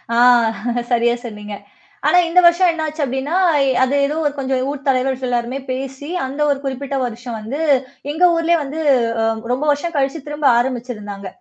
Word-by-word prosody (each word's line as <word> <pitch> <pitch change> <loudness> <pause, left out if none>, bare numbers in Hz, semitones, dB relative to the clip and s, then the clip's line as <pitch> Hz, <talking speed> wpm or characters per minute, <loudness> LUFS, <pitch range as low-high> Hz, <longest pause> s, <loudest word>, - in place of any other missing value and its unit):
ஆ, - - +2 0.7
சரியா 240 0 +3
சொன்னீங்க. 210 -2 -7 0.5
ஆனா 360 - +5
இந்த 360 +2 +5
வருஷம் 345 +1 +5
என்ன 320 -1 -3
ஆச்சு 310 0 -4
அப்படின்னா, 265 +5 -3 0.2
அ - - +3 0.3
அது 260 - -1
எதோ 295 - -3
ஒரு 310 - +1
ஊர் 285 - -14
கொஞ்சம் 265 -1 -1
ஊர் 285 -1 -5
தலைவர்கள் 260 0 0
எல்லாருமே 245 +2 -1
பேசி 270 +2 -5 0.2
அந்த 275 +3 -6
ஒரு 280 - +1
குறிப்பிட்ட 270 +1 -3
வருஷம் 240 0 -5
வந்து 245 +8 -5 0.5
எங்க 325 +4 +1
ஊர்லேயே 335 +1 +2
வந்து 290 +3 -5 0.4
அ - - +2 0.3
ரொம்ப 265 +4 -1
வருஷம் 320 +4 -2
கழிச்சு 275 +3 0
திரும்ப 295 0 -2
ஆரம்பிச்சுருந்தாங்க. 230 -5 -4
270 Hz, 175 wpm, -19 LUFS, 245-300 Hz, 0.7 s, ஆனா